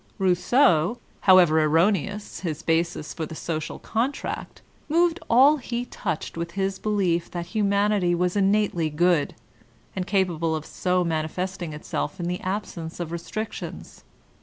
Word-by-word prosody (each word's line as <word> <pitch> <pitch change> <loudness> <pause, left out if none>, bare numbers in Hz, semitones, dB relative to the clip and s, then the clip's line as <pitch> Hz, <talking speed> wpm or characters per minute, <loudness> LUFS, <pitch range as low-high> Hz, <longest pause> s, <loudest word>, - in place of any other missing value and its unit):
Rousseau, 190 - +3 0.3
however 175 -4 +7
erroneous 190 +6 +1
his 160 -5 -4
basis 165 -1 0
for 160 - -4
the 160 - -8
''So 160 0 -3
cial 155 - -7
Contract," 240 +6 -3 0.3
moved 340 +2 +3
all 270 +6 +6
he 245 -2 -4
touched 170 -9 -4
with 170 0 -4
his 195 0 -1
belief 190 -5 0
that 175 -1 -4
humanity 200 -3 +2
was 180 +1 0
innately 195 -5 +2
good, 170 0 +2 0.6
and 185 -1 -3
capable 175 -5 +1
of 155 -1 -5
so 180 0 0
mani 160 -2 -1
festing 180 0 -4
itself 150 +1 -4
in 170 - -2
the 180 +1 -3
absence 185 -4 -4
of 170 -2 -4
restrictions. 190 +6 -6
180 Hz, 140 wpm, -25 LUFS, 165-205 Hz, 0.6 s, however